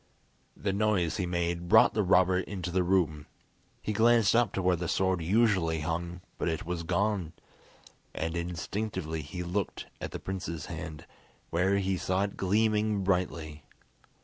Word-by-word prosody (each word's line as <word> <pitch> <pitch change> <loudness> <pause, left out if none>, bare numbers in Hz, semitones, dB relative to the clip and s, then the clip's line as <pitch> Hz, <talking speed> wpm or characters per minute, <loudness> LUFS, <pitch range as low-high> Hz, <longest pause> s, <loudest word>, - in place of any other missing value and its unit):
The 100 -2 -1
noise 100 -5 +1
he 90 - -1
made 85 0 -2
brought 110 +5 +7
the 110 - +1
robber 95 -1 +4
into 95 -2 -4
the 95 +1 +2
room. 85 -5 +1 0.6
He 105 - -1
glanced 115 0 +4
up 120 -4 +3
to 95 - -1
where 90 0 +3
the 85 0 -4
sword 95 -1 +1
usually 90 -4 +2
hung, 85 +2 -3 0.2
but - - 0
it 80 -1 -3
was 90 0 -3
gone; 95 -1 0 0.8
and 80 +1 -3
instinctively 85 -1 -3
he 85 +5 -6
looked 90 +3 -3 0.2
at - - -3
the - - -5
prince's 95 -5 -5
hand, 80 +2 -7 0.5
where 95 +4 +2
he 95 -1 0
saw 95 +2 0
it 100 - -3
gleaming 105 +1 +1
brightly. 85 -5 -1
90 Hz, 155 wpm, -29 LUFS, 85-100 Hz, 0.8 s, brought